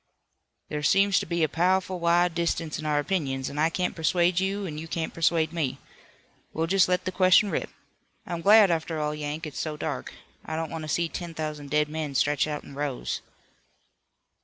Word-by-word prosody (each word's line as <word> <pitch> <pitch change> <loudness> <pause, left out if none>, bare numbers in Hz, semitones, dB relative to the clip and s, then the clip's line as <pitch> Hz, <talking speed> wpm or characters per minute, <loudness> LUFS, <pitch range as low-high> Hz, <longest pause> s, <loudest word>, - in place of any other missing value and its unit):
"There 150 - -3
seems 195 +5 +4
to - - -5
be 170 0 0
a - - +4
pow'ful 180 +3 +1
wide 170 +1 +3
difference 165 -2 -1
in 155 - -4
our 150 -1 +1
opinions, 140 -4 -1
an' 145 - -5
I 160 +2 +3
can't 180 +2 -2
persuade 175 +2 +2
you 195 +1 -1
an' 155 -4 -5
you 165 - -7
can't 160 0 -3
persuade 165 -1 +1
me. 155 -7 -1 0.8
We'll 160 - 0
just 190 +2 +3
let 180 0 +1
the 185 - -1
question 185 +2 +4
rip. - - -2 0.6
I'm 170 -1 -4
glad, 205 +1 +7
after 160 -1 -1
all, 150 0 -1
Yank, 150 +2 -4
it's 150 - -6
so 155 -1 -3
dark. - - -4 0.3
I 160 - -5
don't 160 0 -3
want 160 - -4
to - - -7
see 170 +2 +1
ten 170 0 -6
thousand 150 -2 -5
dead 150 +1 +2
men 150 -2 -4
stretched 145 +3 +2
out 150 -1 -4
in - - -12
rows." 140 -2 -3
165 Hz, 200 wpm, -26 LUFS, 150-180 Hz, 0.8 s, glad